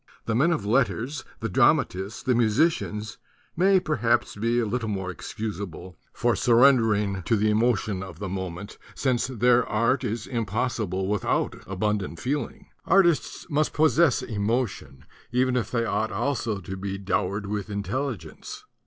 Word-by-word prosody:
The 115 - -1
men 145 +10 +3
of 135 -12 -1
letters, 125 +4 0 0.2
the - - -1
drama - - +4
tists, 95 +4 -7
the 130 - +2
musicians, 115 -2 +1 0.4
may 190 +3 +4
perhaps 120 -8 0
be 115 +3 +1
a 120 - +1
little 110 +1 -2
more 95 -3 -3
excusable 95 -3 -6 0.2
for 120 -1 +1
surrendering 115 -6 +4
to 115 - +2
the 105 0 +2
emotion 110 -3 +1
of 95 -3 -8
the 100 - -5
moment, 95 +1 -6 0.2
since 125 -3 0
their 125 0 +3
art 115 +4 +1
is 110 0 -3
impossible 110 -4 -2
without 105 -1 0
abundant 95 -3 -2
feeling. 140 - -3 0.2
Artists 175 -4 +2
must 155 -2 0
possess 155 -3 +3
emotion, 105 - -2 0.3
even 125 +1 +2
if 120 -5 -1
they 115 -2 0
ought 110 0 -1
also 115 -7 -1
to 95 +2 -6
be 95 0 -4
dowered 100 +1 -1
with 105 0 -4
intelligence. 105 - -4
110 Hz, 145 wpm, -25 LUFS, 100-125 Hz, 0.4 s, drama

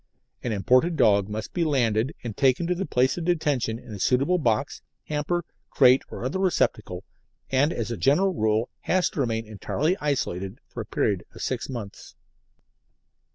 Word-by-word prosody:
An 125 - -3
imported 130 - +2
dog 100 -2 +4
must 105 0 -5
be 175 - +1
landed 125 -4 +1
and 115 -4 -5
taken 135 +3 +2
to 180 - +1
its 180 +2 -3
place 130 +3 +1
of 165 - -4
detention 145 -10 0
in 120 -2 -11
a 100 - -7
suitable 140 - +2
box, 120 -1 0 0.3
hamper, 155 +3 -1 0.2
crate 130 -1 +5
or - - -6
other 140 +9 -2
receptacle, 190 -2 0 0.5
and 135 +4 +3
as 115 -4 -3
a 115 - -3
general 175 - +3
rule 110 -3 +1
has 185 -1 +1
to - - -6
remain 115 -4 0
entirely 140 - -1
isolated 100 -9 -2
for 120 - -6
a 110 - -8
period 100 -5 0
of - - -7
six - - -3
months. 115 -6 -8
125 Hz, 170 wpm, -25 LUFS, 110-155 Hz, 0.5 s, crate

